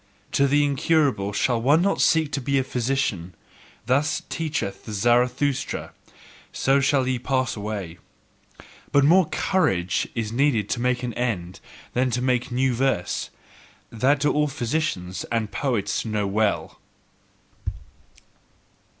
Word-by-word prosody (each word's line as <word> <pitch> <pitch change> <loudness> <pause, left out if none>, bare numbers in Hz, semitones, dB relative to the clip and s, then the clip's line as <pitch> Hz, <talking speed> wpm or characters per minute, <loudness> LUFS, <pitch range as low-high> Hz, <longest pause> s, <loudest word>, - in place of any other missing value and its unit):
To 140 - +3
the 145 +1 +3
incurable 140 -7 +1
shall 115 +3 +1
one 145 +8 +4
not 200 - +1
seek 160 -2 +3
to 140 - -2
be 140 +2 0
a 135 - +2
physician: 120 -9 -2 0.5
thus 135 +5 +1
teacheth 150 -12 -3
Zarathustra: 125 +5 0 0.6
so 135 +1 +2
shall 135 -1 +2
ye 130 -1 0
pass 130 -1 -1
away! 100 -5 -5 0.9
But 140 -1 +4
more 175 +2 +5
COURAGE 95 - 0
is 110 -2 -2
needed 120 -5 +1
to 120 - -1
make 125 0 0
an 120 -1 -3
end 95 -7 -3 0.3
than 130 +1 +1
to 125 +1 -1
make 125 -1 +1
a - - -7
new 130 0 +2
verse: 130 -7 -1 0.6
that 135 +5 +2
do 145 - +2
all 150 0 +2
physicians 120 - -2
and 115 -3 -1
poets 115 -8 -1
know 105 -2 -1
well. 105 +1 -1
125 Hz, 135 wpm, -24 LUFS, 110-140 Hz, 0.9 s, more